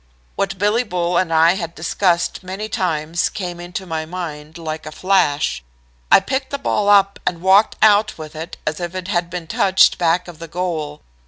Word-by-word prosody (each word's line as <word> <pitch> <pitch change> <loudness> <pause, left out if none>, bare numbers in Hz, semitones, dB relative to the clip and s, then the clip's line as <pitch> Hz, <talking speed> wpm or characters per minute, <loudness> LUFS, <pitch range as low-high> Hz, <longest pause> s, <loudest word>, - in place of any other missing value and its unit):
What 195 -1 -2
Billy 210 +4 +2
Bull 180 -6 -2
and 180 -2 +1
I 165 +1 +5
had 170 -3 -5
discussed 170 +1 0
many 190 +3 -5
times 170 -4 -1
came 175 -3 -5
into 175 +2 -6
my 160 -3 -3
mind 160 -2 -7
like 155 -1 -6
a - - -6
flash. 165 - +1 0.5
I - - +9
picked 265 0 -3
the 280 - -3
ball 210 -7 0
up 200 -1 +4
and 175 -2 0
walked 190 +4 +4
out 215 0 +4
with 155 -1 -9
it 160 +3 -7
as 155 +2 -2
if 175 +1 -5
it 185 0 -5
had 175 -3 0
been 175 -1 -5
touched 190 +3 +3
back 175 +1 +1
of 170 -2 -11
the 165 - -8
goal. 160 -4 -4
175 Hz, 190 wpm, -19 LUFS, 165-195 Hz, 0.5 s, I